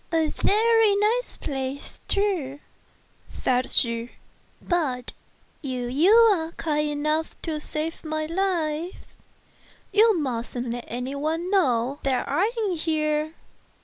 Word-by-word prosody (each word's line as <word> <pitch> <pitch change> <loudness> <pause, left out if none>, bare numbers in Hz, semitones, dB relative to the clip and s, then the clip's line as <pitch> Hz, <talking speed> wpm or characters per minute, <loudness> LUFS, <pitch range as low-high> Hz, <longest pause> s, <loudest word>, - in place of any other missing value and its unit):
"And 320 -2 +2
a - - -8
very 445 0 +4
nice 440 +5 +1
place, 270 0 -5
too," 355 -10 0 0.7
said 255 0 0
she; 235 0 0 0.5
"but 285 -9 -1 0.5
if 250 -3 -3
you 330 +9 +4
are 410 -8 +5
kind 300 -1 -1
enough 305 +2 -1
to 330 - -2
wish 305 -1 -3
to - - -13
save 315 +2 -3
my 310 -1 -2
life, 335 -1 -2 0.9
you 430 -1 +5
musn't 245 -2 -3
let 240 0 -6
it 245 +1 -3
be 270 - -4
known 290 - 0
that 265 -2 0
I 355 +11 +1
am 370 -4 -1
here." 310 -1 0
310 Hz, 130 wpm, -25 LUFS, 270-360 Hz, 0.9 s, are